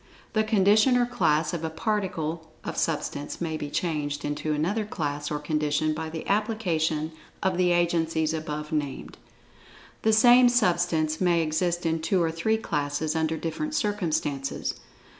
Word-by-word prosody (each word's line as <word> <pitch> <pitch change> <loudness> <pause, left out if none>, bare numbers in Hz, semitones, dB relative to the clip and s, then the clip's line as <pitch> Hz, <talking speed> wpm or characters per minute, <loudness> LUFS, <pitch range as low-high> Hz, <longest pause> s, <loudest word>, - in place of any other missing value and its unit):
The 215 -1 +3
condition 215 +3 +4
or 245 - +3
class 155 -8 +1
of 165 -2 -3
a 160 - -1
particle 165 -3 -2
of - - -5
Substance 145 -2 -2
may 165 -2 -2
be 150 -2 -4
changed 145 -3 -2
into 150 +1 -2
another 175 +9 0
class 145 -7 -3
or 150 - -1
condition 150 0 0
by 160 +1 -4
the 160 0 -6
application 170 -7 0 0.3
of 190 -1 +1
the 180 0 +2
agencies 165 -2 +1
above 150 -1 -4
named. 145 -3 -3 0.8
The 220 - +3
same 245 +3 +7
substance 175 -8 +1
may 175 -2 +3
exist 170 +2 -1
in 165 0 0
two 185 +3 +1
or 165 -2 +1
three 195 +7 0
classes, 150 -4 -2
under 160 0 0
different 230 - -3
circumstances. 160 - -1
160 Hz, 150 wpm, -26 LUFS, 155-190 Hz, 0.8 s, same